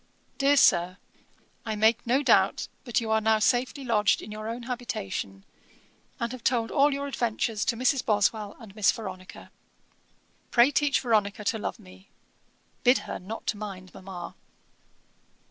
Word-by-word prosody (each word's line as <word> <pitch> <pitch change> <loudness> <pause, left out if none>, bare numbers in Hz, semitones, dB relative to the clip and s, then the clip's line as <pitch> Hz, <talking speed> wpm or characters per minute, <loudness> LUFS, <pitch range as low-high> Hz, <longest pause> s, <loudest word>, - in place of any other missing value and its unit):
'DEAR 280 +1 +4
SIR, 180 -6 +4 0.7
'I 220 -2 -3
make 220 +2 +2
no 260 +4 +2
doubt - - +3 0.2
but 240 -5 0
you 225 -2 -3
are 220 0 +3
now 220 0 +3
safely 250 +5 +1
lodged 210 -4 +2
in 210 - -9
your 215 +1 -6
own 235 +1 -5
habitation, 100 - -5 0.7
and 235 0 -2
have 255 -3 -8
told 230 -2 +1
all 285 +1 +4
your 280 0 -3
adventures 230 -5 -1
to 235 - 0
Mrs. 255 +1 +1
Boswell 210 0 0
and 215 -4 -13
Miss 210 -4 +4
Veronica. 185 -4 -9 1.0
Pray 240 +3 +5
teach 290 -1 +2
Veronica 210 -4 0
to 220 +2 -1
love - - -4
me. 95 +1 -17 0.7
Bid 250 +2 +5
her - - -5
not 215 +5 -4
mind 195 -3 -8
mamma. 185 -2 -8
220 Hz, 150 wpm, -27 LUFS, 205-245 Hz, 1.0 s, Pray